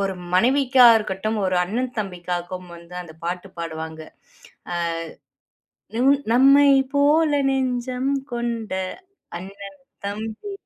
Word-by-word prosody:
ஒரு 195 -1 0 0.2
மனைவிக்கா 255 +5 +5
இருக்கட்டும், 215 +1 -2
ஒரு 185 -1 +1
அண்ணன் 245 +6 -3
தம்பிக்காகவு 180 -2 -4
வந்து 170 +1 -13
அந்த 160 -3 -13
பாட்டு 180 +2 -4
பாடுவாங்க. 160 -1 -6
ஆ. - - -42 1.8
நும் 265 +4 +4 0.2
நம்மை 275 +3 +6 0.2
போல 295 +2 +4 0.2
நெஞ்சம் 255 0 -1 0.2
கொண்ட 235 -3 -3 0.7
அண்ணன் 200 +7 -10 0.3
தம்பி. 220 - -5
220 Hz, 100 wpm, -22 LUFS, 180-255 Hz, 1.8 s, நம்மை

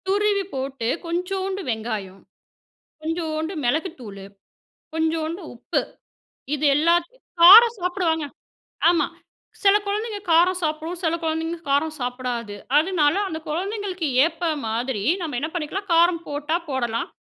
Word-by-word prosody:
துருவி 405 0 +2
போட்டு 265 -3 -3 0.2
கொஞ்சோண்டு 380 +3 -2
வெங்காயம், 215 -4 -4 0.8
கொஞ்சோண்டு 320 0 -2
மெளகுத்தூளு, 245 - -3 0.7
கொஞ்சோண்டு 320 +2 -1
உப்பு. 235 - -1 0.7
இது 300 +1 -2
எல்லாத் 340 +3 +2 0.3
காரம் 450 +6 +10
சாப்பிடுவாங்க. 350 -3 0 0.7
ஆமா. 335 -4 +2 0.6
சில 400 0 +6
கொழந்தைங்க 420 +1 -2
காரம் 355 +3 +4
சாப்பிடும், 315 +2 -2
சில 325 -1 +1
கொழந்தைங்க 325 +1 -2
காரம் 310 +3 +1
சாப்பிடாது, 245 -3 -3 0.2
அதுனால 315 -2 +2
அந்த 315 - -4
கொழந்தைங்களுக்கு 375 +1 -3 0.2
ஏத்த 330 +1 -1 0.2
மாதிரி 230 -1 -2 0.2
நம்ம 310 -7 -3
என்ன 310 - -2
பண்ணிக்கலாம் 355 +4 -4
காரம் 335 0 +4
போட்டா 295 +2 -1
போடலாம். 240 -4 -2
320 Hz, 110 wpm, -23 LUFS, 280-360 Hz, 0.8 s, காரம்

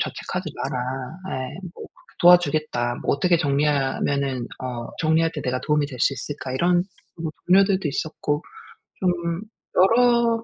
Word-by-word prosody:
자책하지 - - -3
마라." 125 - -3 0.6
예. 130 - -6 0.2
뭐 - - -10
그렇게 - - -25
"도와주겠다. 155 -8 +4
뭐 - - +2
어떻게 175 +3 +3
정리하면은 140 -3 0 0.2
어 120 -2 -4
정리할 160 +1 +2
때 150 - -4
내가 125 0 -1
도움이 150 -1 +1
될 130 -3 -9
수 - - +3
있을까?" 130 +1 -6
이런 175 +5 +2 0.4
뭐 155 -1 -3 0.2
동료들도 190 -2 +4
있었고 150 +1 -2 0.6
좀 175 -1 0 0.3
여러 230 +3 +4
155 Hz, 305 characters per minute, -23 LUFS, 135-180 Hz, 0.6 s, 도와주겠다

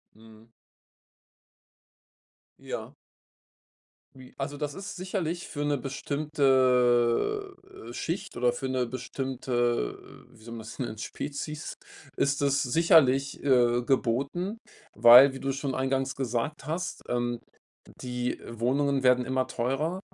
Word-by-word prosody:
Mhm. 110 +1 -18 2.1
Ja. - - -6 1.2
Wie 130 -1 -14
also, 140 +1 -4
das 145 -1 -3
ist 195 +5 -7
sicherlich 180 -2 -3
für 145 -2 -4
'ne 145 -1 +1
bestimmte 135 - +1 0.4
Schicht 165 +9 -4
oder 120 0 +3
für 130 +2 -4
'ne 130 -2 -1
bestimmte, 125 - -3
wie 115 -3 -19
soll 115 +1 -8
man 115 - -7
es 110 +5 -10
nennen, 120 -4 -4
Spezies, 145 +6 -5 0.4
ist 140 0 +1
es 140 -1 +2
sicherlich, 140 -2 +3
äh, 120 -3 +3
geboten, 140 - -1 0.4
weil, 125 +3 +9
wie 135 - -7
du 135 - -2
schon 135 -1 -3
eingangs 135 0 -1
gesagt 130 +3 -3
hast, 165 +3 -4
ähm, 120 -1 -1 0.6
die 125 0 -3
Wohnungen 135 +4 0
werden 125 -1 +4
immer 130 0 0
teurer 135 +9 -2
135 Hz, 115 wpm, -28 LUFS, 120-145 Hz, 2.1 s, weil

